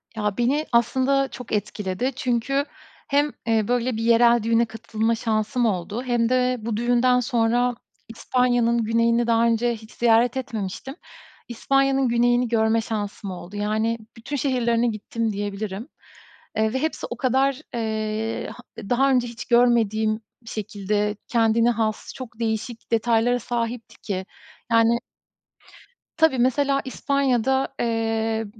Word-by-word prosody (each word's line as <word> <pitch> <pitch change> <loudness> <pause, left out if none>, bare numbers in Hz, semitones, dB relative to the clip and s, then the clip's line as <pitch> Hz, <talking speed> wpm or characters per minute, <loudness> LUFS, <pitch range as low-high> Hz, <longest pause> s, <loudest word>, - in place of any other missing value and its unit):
Ya, 210 -1 -2
beni 275 +6 +1
aslında 260 +3 +2
çok 250 -3 -10
etkiledi 210 +3 -2
çünkü 255 +3 0 0.4
hem, 290 0 +2 0.2
eee, 220 -2 +2
böyle 245 -1 0
bir 225 - -2
yerel 235 0 +5
düğüne 230 +1 +3
katılma 225 0 -2
şansım 225 +2 0
oldu 205 +3 -2
hem 240 -2 +1
de 255 0 +2
bu 220 -1 -3
düğünden 245 +2 +3
sonra 240 0 +1 0.3
İspanya'nın 235 0 +1
güneyini 230 +1 +2
daha 230 0 +3
önce 235 +1 +2
hiç 220 0 -14
ziyaret 235 +2 +3
etmemiştim. 240 +1 -5 0.5
İspanya'nın 270 +2 +1
güneyini 240 +1 +2
görme 225 0 +2
şansım 205 -3 -4
oldu. 180 +2 -9
Yani 215 +2 0 0.2
bütün 260 +6 -5
şehirlerine 240 -3 +1
gittim 225 0 -2
diyebilirim. 205 +3 -4 0.7
Eee, 220 +1 +1
ve 260 - 0
hepsi 315 - -2
o 240 - -5
kadar, 265 +1 +1
eee, 220 -1 -2 0.3
h 200 - -8
daha 270 +3 +3
önce 250 -2 +2
hiç 235 0 -8
görmediğim 220 -3 +2 0.2
bir 225 - -10
şekilde 210 0 -2
kendine 230 0 +3
has, 220 -2 -2
çok 240 -3 -9
değişik 230 +1 -3
detaylara 235 +1 +2
sahipti 235 -1 -4
ki. 190 -2 -3 0.5
Yani 230 +1 +4 1.2
Tabii. 320 -5 +4
Mesela 275 +2 +2
İspanya'da, 265 -1 +1
eee, 225 -1 0
230 Hz, 130 wpm, -23 LUFS, 220-250 Hz, 1.2 s, yerel